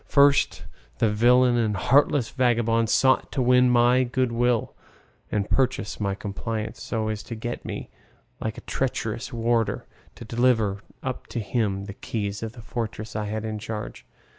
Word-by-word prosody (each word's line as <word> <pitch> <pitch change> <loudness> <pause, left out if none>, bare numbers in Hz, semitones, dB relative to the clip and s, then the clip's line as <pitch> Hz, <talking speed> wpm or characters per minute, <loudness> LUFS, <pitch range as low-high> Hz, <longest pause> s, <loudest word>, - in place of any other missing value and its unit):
First, 140 0 +4 0.3
the 110 - +2
villain 120 +3 +4
and 110 -4 +1
heartless 140 +1 +3
vagabond 115 -3 +2
sought 130 +2 +3
to - - -2
win 125 0 +5
my 125 +1 +4
good 125 0 0
will 120 -1 +1 0.6
and 100 -1 0
purchase 130 -4 0
my 100 -2 -1
compliance, 110 +2 -5
so 110 -2 -2
as 105 -1 -3
to 115 +2 -7
get 120 +2 -5
me, - - -6 0.5
like 110 +1 -4
a - - -7
treacherous 115 -3 -3
warder, 115 -1 0 0.3
to 120 - -10
deliver 115 -4 +2 0.2
up 130 -2 -4
to 120 - -4
him 100 -2 -1
the 100 - -7
keys 100 -1 -4
of 110 0 -5
the 120 -3 -12
fortress 110 -1 -5
I 110 -1 -1
had 110 +1 -3
in 110 -1 -3
charge. 110 0 -6
115 Hz, 165 wpm, -25 LUFS, 110-125 Hz, 0.6 s, win